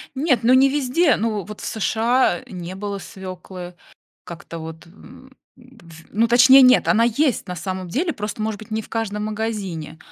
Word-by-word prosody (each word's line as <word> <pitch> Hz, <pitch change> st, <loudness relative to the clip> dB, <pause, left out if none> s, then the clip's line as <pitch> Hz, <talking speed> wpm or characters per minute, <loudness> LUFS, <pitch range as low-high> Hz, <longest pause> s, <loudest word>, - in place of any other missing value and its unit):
Нет, 265 Hz, -3 st, +1 dB
ну 240 Hz, -, +4 dB
не 265 Hz, +1 st, +6 dB
везде, 290 Hz, +1 st, +2 dB
ну 215 Hz, -3 st, -2 dB
вот 210 Hz, +2 st, -10 dB
в -, -, -8 dB
США 230 Hz, +4 st, +1 dB
не 180 Hz, -5 st, -7 dB
было 200 Hz, +1 st, -5 dB
свёклы 185 Hz, -2 st, -9 dB, 0.5 s
как-то 170 Hz, -1 st, -9 dB
вот, 160 Hz, +1 st, -9 dB
м 255 Hz, +9 st, -16 dB, 0.2 s
д 245 Hz, -6 st, -19 dB
ф 165 Hz, -1 st, -15 dB
ну, 225 Hz, +3 st, +1 dB
точнее, 260 Hz, +3 st, +7 dB
нет, 255 Hz, 0 st, +5 dB
она 230 Hz, +1 st, +4 dB
есть 240 Hz, -1 st, 0 dB
на 180 Hz, -, -5 dB
самом 185 Hz, +1 st, -5 dB
деле, 330 Hz, -, -1 dB
просто, 210 Hz, -3 st, -6 dB
может 215 Hz, -1 st, -3 dB
быть, 215 Hz, -, -13 dB
не 220 Hz, 0 st, -2 dB
в -, -, -15 dB
каждом 210 Hz, -2 st, -3 dB
магазине, 205 Hz, -8 st, -4 dB
215 Hz, 185 wpm, -21 LUFS, 185-255 Hz, 0.5 s, точнее